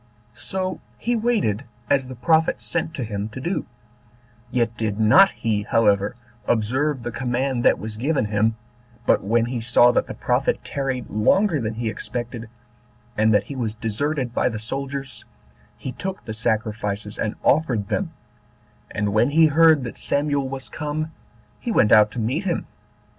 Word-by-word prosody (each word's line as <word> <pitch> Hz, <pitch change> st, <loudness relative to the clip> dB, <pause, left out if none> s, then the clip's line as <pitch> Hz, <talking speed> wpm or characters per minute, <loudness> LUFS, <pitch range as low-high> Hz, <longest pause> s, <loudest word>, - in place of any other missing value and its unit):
So 185 Hz, -1 st, -3 dB, 0.2 s
he 240 Hz, +1 st, -1 dB
waited 225 Hz, -, +1 dB
11 -, -, -16 dB, 0.3 s
as 135 Hz, -2 st, +3 dB
the 130 Hz, -, -8 dB
prophet 160 Hz, +7 st, +2 dB
sent 165 Hz, -1 st, -2 dB
to 130 Hz, -, -3 dB
him 105 Hz, -1 st, -4 dB
to 120 Hz, -, -8 dB
do; 175 Hz, +8 st, -2 dB, 0.8 s
yet 120 Hz, -2 st, 0 dB
did 110 Hz, -2 st, -2 dB
not 110 Hz, -, +7 dB
he, 110 Hz, -2 st, -1 dB
however, 105 Hz, -1 st, +2 dB, 0.3 s
observe 130 Hz, +5 st, 0 dB
the 120 Hz, -, -3 dB
command 125 Hz, +1 st, -1 dB
that -, -, +5 dB
was 110 Hz, 0 st, -7 dB
given 135 Hz, 0 st, 0 dB
him, 110 Hz, +2 st, +1 dB, 0.5 s
but -, -, +3 dB
when 115 Hz, +3 st, +2 dB
he 120 Hz, -1 st, -3 dB
saw 120 Hz, +1 st, +5 dB
that -, -, +1 dB
the -, -, -6 dB
prophet -, -, 0 dB
tarried 135 Hz, -3 st, -3 dB
longer 160 Hz, -, +3 dB
than 110 Hz, -1 st, -3 dB
he 115 Hz, 0 st, -3 dB
expected, 120 Hz, +1 st, -5 dB, 0.7 s
and 110 Hz, 0 st, +3 dB
that 105 Hz, -2 st, +4 dB
he 140 Hz, +6 st, -8 dB
was 115 Hz, -4 st, -2 dB
deserted 125 Hz, +4 st, -2 dB
by -, -, +2 dB
the 110 Hz, -, -4 dB
soldiers, 135 Hz, +4 st, -5 dB, 0.5 s
he 130 Hz, -, -5 dB
took 190 Hz, +7 st, -6 dB
the 110 Hz, -, -5 dB
sacrifices 105 Hz, -2 st, -2 dB
and 105 Hz, -, -1 dB
offered 130 Hz, -9 st, +2 dB
them; -, -, -1 dB, 0.8 s
and 105 Hz, 0 st, -2 dB
when 115 Hz, +5 st, +3 dB
he 160 Hz, +2 st, +5 dB
heard 155 Hz, -1 st, +5 dB
that 120 Hz, -, -6 dB
Samuel 140 Hz, -2 st, 0 dB
was 135 Hz, 0 st, -6 dB
come, 155 Hz, +1 st, -4 dB, 0.5 s
he 240 Hz, -, -3 dB
went 105 Hz, -, +3 dB
out 105 Hz, -1 st, +7 dB
to 125 Hz, -, -4 dB
meet 130 Hz, -, -1 dB
him. 175 Hz, -, -1 dB
120 Hz, 170 wpm, -23 LUFS, 110-145 Hz, 0.8 s, not